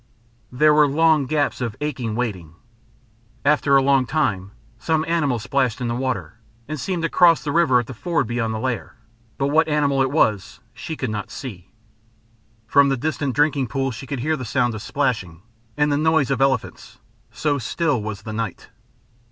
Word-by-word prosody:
There 150 +5 +4
were 150 -1 +5
long 155 -1 +3
gaps 145 -2 0
of 115 -4 -3
aching 130 -7 -3
waiting. 95 -10 -4 0.9
After 145 -1 +3
a 135 - +3
long 135 -2 +3
time 110 -11 -1 0.3
some 160 +5 0
animal 155 -7 +1
splashed 125 +1 -1
in 120 -2 -2
the - - -1
water, 125 -2 -3 0.3
and 155 -1 -5
seemed 175 +4 -3
to - - +2
cross 170 -1 +4
the 150 - -2
river 140 -6 +4
at 120 - -3
the 130 - -8
ford 170 +7 -1
beyond 115 -1 -2
the 110 - -3
lair, 130 0 -3 0.4
but 140 +1 0
what 160 +3 +3
animal 145 -3 +1
it 135 - +2
was 110 -7 0
she 125 +7 -6
could 130 -6 -3
not 105 -2 -4
see. 100 -10 -8 1.0
From 140 +4 +4
the 135 - 0
distant 145 -1 -2
drinking 145 -3 +2
pools 135 +2 -2
she 135 +4 -9
could 135 -3 -4
hear 155 +4 0
the 130 - -6
sound 120 0 0
of 110 - -6
splashing, 110 - -2 0.3
and 150 0 +2
the 145 - +2
noise 160 -3 +2
of 135 -1 0
elephants 135 0 -1 0.3
so 145 -2 -1
still 140 +1 -1
was 105 -1 -6
the 110 - -6
night. 110 -4 -5
135 Hz, 185 wpm, -22 LUFS, 115-150 Hz, 1.0 s, were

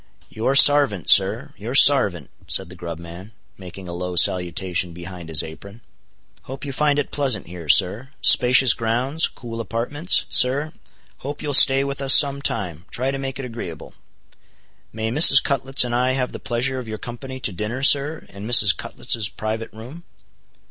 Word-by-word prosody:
"Your 115 +5 -3
sarvant, 140 - +4
sir, - - +2
your 115 +6 -8
sarvant," 100 - +3 0.2
said 95 -2 -1
the 90 - -13
grub 85 -2 -9
man, 85 +5 -13 0.2
making 95 0 -13
a 85 - -8
low 90 +1 -7
salutation 90 0 0
behind 85 -1 -11
his 80 0 -1
apron. 100 +8 -13 0.6
"Hope 135 +2 -10
you 140 - -7
find 145 +1 -1
it 145 - -4
pleasant 130 -10 -1
here, 85 -2 -12
sir;—spacious 125 - +3
grounds—cool 120 0 -3
apartments, 135 +9 -1
sir—hope 140 +1 -3
you'll 145 -1 -4
stay 135 0 +5
with 140 0 -6
us 135 -1 +6
some 140 -1 +2
time—try 100 - -5
to 135 - -7
make 135 -1 -7
it 135 - -8
agreeable. 115 -10 -10 1.0
May 110 0 -5
Mrs. 140 0 +6
Cutlets 135 -1 +2
and 120 -1 -5
I 125 +2 -1
have 130 -1 -4
the - - -10
pleasure 120 +4 -3
of 125 - -10
your 110 0 -7
company 130 +4 -10
to 110 - -3
dinner, 105 +8 -7
sir, 145 +3 +2
in 100 +2 -11
Mrs. 105 -6 +5
Cutlets' 110 -2 -3
private 110 +2 -7
room?" 125 +10 -13
120 Hz, 160 wpm, -19 LUFS, 95-135 Hz, 1.0 s, us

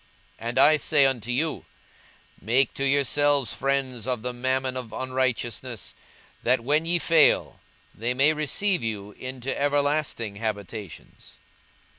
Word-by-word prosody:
42:016:009 115 - -6
And 120 - -4
I 155 +1 +6
say 145 -2 +3
unto 125 -4 -1
you, 155 +5 -1 0.8
Make 125 +6 +2
to 135 - -3
yourselves 140 -3 +2
friends 130 -4 -1
of 125 -4 -2
the 125 0 -3
mammon 130 +1 -1
of 125 -3 -6
unrighteousness; 130 -2 -3 0.5
that, 125 0 +2
when 150 +6 +1
ye 175 +1 +2
fail, 165 -2 +3 0.3
they 120 +3 -2
may 140 +4 +4
receive 155 +4 0
you 105 -3 -4
into 130 +3 -5
everlasting 145 -7 0
habitations. 105 -3 -7
130 Hz, 130 wpm, -25 LUFS, 115-145 Hz, 0.8 s, I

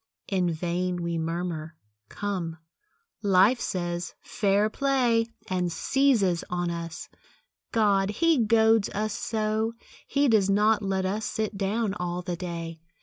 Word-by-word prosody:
In 185 -3 +1
vain 175 +2 -2
we 170 -1 -1
murmur; 165 -1 -3 0.3
"Come," 185 -5 -3 0.6
Life 200 +4 +4
says, 175 -1 -3
"Fair 205 0 +1
play!" 245 -2 +2 0.2
And 180 -2 -1
seizes 220 -7 +2
on 175 -1 -1
us. 170 0 -6 0.6
God! 200 -3 +3
he 325 +7 +2
goads 220 -1 +4
us 215 0 -1
so! 220 0 -1 0.3
He 285 0 +2
does 215 -5 +3
not 210 +2 +3
let 190 -1 -1
us 210 +3 -1
sit 215 -1 -2
down 200 +2 0
all 180 -3 -3
the 175 -1 -3
day. 170 -2 -6
195 Hz, 130 wpm, -27 LUFS, 175-220 Hz, 0.6 s, Life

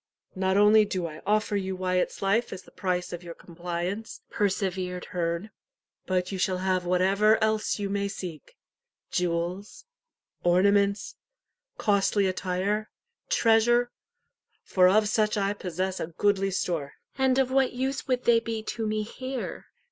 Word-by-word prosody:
"Not 190 0 +1
only 210 +1 +6
do 185 -4 -2
I 155 -1 -7
offer 215 0 +1
you 190 -1 -2
Wyat's 185 +1 -1
life 215 +5 +1
as 185 - -7
the - - -18
price 180 -2 -2
of 175 - -5
your 170 -1 -9
compliance," 175 +5 -5
persevered 185 -3 -1
Herne; 170 +4 -3 0.6
"but 185 0 0
you 190 - -4
shall 185 0 +1
have 185 -1 0
what 180 0 +2
ever 210 +3 +4
else 220 -1 +1
you 205 -1 -2
may 200 0 -1
seek 180 -7 -8 0.6
jewels, 180 - -2 0.6
ornaments, 200 +3 +2 0.6
costly 200 0 +2
attire, 190 +3 -1 0.4
treasure 240 +2 +3 0.7
for 180 -1 +4
of 210 +2 +4
such 215 0 +1
I 200 0 +1
possess 185 -1 -3
a - - -3
goodly 195 +3 +1
store." 170 -6 -2 0.3
"And 265 -1 +3
of 265 -1 +2
what 265 -1 +2
use 265 +3 -2
would 250 -1 0
they 235 -1 +5
be 225 -1 -4
to 225 0 -3
me 215 0 -1
here?" 255 +4 -6
195 Hz, 150 wpm, -27 LUFS, 180-215 Hz, 0.7 s, only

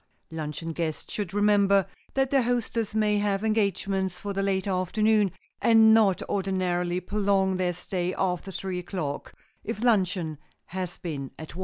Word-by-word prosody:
Luncheon 160 +1 -4
guests 160 -2 -4
should 205 -5 -3
remember 200 -1 +4 0.3
that 270 -1 +1
their 275 -1 +4
hostess 230 -3 -1
may 210 -1 +2
have 205 0 0
engagements 195 -3 0
for 200 -1 -4
the 195 - -1
late 195 -1 0
afternoon, 205 +2 +2 0.3
and 225 -1 +6
not 210 -5 +4
ordinarily 180 -2 0
prolong 195 0 +1
their 180 -1 0
stay 180 +1 -3
after 180 0 -1
three 185 -1 -3
o'clock—if 180 +5 -6
luncheon 185 - +1 0.3
has 180 -1 -5
been 140 -6 -5
at 160 - -9
one. - - -8
195 Hz, 145 wpm, -27 LUFS, 180-210 Hz, 0.3 s, and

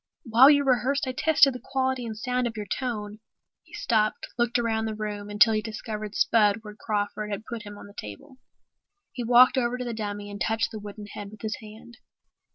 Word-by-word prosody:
While 240 +3 +7
you 285 -1 +5
rehearsed 270 +1 +1
I 260 - -2
tested 285 0 +4
the 250 - -8
quality 260 -2 -1
and 220 -1 -6
sound 250 +1 -1
of 225 -1 -6
your 210 - -4
tone." 210 -2 -4 0.4
He - - -23
stopped, 215 -2 0
looked 240 0 +1
around 225 -2 0
the 220 -1 -3
room 210 -1 -5
until 210 +2 +5
he 215 - +1
discovered 215 -1 -6
Spud 215 -1 +3
where 210 -1 -9
Crawford 210 0 -3
had 205 +1 -5
put 235 -2 -6
him 205 -1 -10
on - - -11
the 200 - -14
chair. 105 -1 -7 1.0
He 245 - -4
walked 250 +3 +6
over 240 0 -1
to 250 - -4
the 240 - -3
dummy 205 -2 -5
and 205 - -8
touched 225 0 0
the 220 - -6
wooden 205 0 -9
head 205 -1 -8
with 215 0 -14
his 215 -1 -2
hand. 220 +2 -13
220 Hz, 210 wpm, -26 LUFS, 210-245 Hz, 1.0 s, While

